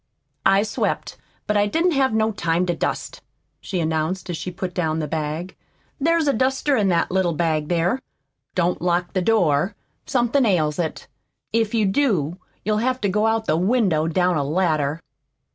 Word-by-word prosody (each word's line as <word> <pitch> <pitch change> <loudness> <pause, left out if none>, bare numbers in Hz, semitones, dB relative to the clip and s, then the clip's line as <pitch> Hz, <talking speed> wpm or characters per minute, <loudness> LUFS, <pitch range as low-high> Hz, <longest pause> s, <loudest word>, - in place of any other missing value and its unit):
"I 195 +1 +4
swept, 215 0 -2 0.3
but 210 - 0
I 205 0 +3
didn't 330 - +2
have 270 -3 +2
no 220 0 +1
time 170 -3 0
to 175 - 0
dust," - - -3 0.4
she 185 - -4
announced 160 +3 -1
as 170 - -3
she 185 - -5
put 180 0 -5
down 160 -3 0
the 155 -2 -2
bag. 155 +4 -3 0.4
"There's 330 +1 +2
a 280 - +3
duster 265 +4 +1
in 210 -4 +2
that 170 -3 +1
little 185 -2 +1
bag 155 -1 0
there. 175 +8 +1 0.6
Don't 175 0 +1
lock 175 0 0
the 185 - +1
door. 180 -4 +2 0.3
Somethin' 250 +1 +2
ails 160 -9 +1
it. 165 -2 -3 0.5
If 225 0 +1
you 220 -2 +3
do 190 - +1 0.3
you'll 210 0 +1
have 255 +2 0
to 205 - +1
go 210 +3 +2
out 225 0 +1
the 155 - +2
window 185 -5 +2
down 180 +1 +2
a 145 - +1
ladder. 155 -1 0
185 Hz, 180 wpm, -22 LUFS, 165-220 Hz, 0.6 s, I